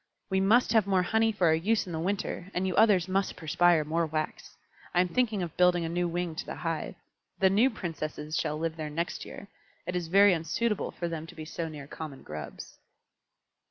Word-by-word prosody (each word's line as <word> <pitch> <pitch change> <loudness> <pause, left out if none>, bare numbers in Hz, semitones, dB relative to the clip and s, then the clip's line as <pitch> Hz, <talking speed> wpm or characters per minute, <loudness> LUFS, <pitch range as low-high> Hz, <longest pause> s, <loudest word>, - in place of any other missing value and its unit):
"We 190 - +3
must 225 +5 +4
have 220 -3 +4
more 190 -2 +3
honey 220 +4 +2
for 205 -4 0
our 160 - +5
use 200 +7 +1
in 180 - -7
the 160 - -2
winter, 185 0 -2
and 180 +1 0
you 185 - -1
others 205 -5 +5
must 195 +1 0
perspire 165 0 +3
more 165 +2 0
wax. 155 0 -4 0.4
I - - +4
am 180 - 0
thinking 220 -4 +1
of 170 - -6
building 180 -1 +4
a - - -3
new 175 +1 0
wing 175 0 -2
to 205 - -4
the - - -5
hive. - - -3 0.4
The 190 -1 +4
new 225 +7 +4
Princesses 155 - -5
shall 150 -1 -1
live 165 +1 -3
there 155 -1 -4
next 165 +4 -3
year; 200 - -10 0.4
it 180 +1 -3
is 175 -2 -2
very 200 +3 +6
unsuitable 190 +7 -1
for 175 - -4
them 165 -1 -5
to - - -12
be 155 - -7
so 165 +1 -4
near 150 -3 -8
common 150 -1 -8
Grubs." 75 -2 -8
175 Hz, 215 wpm, -29 LUFS, 160-195 Hz, 0.4 s, very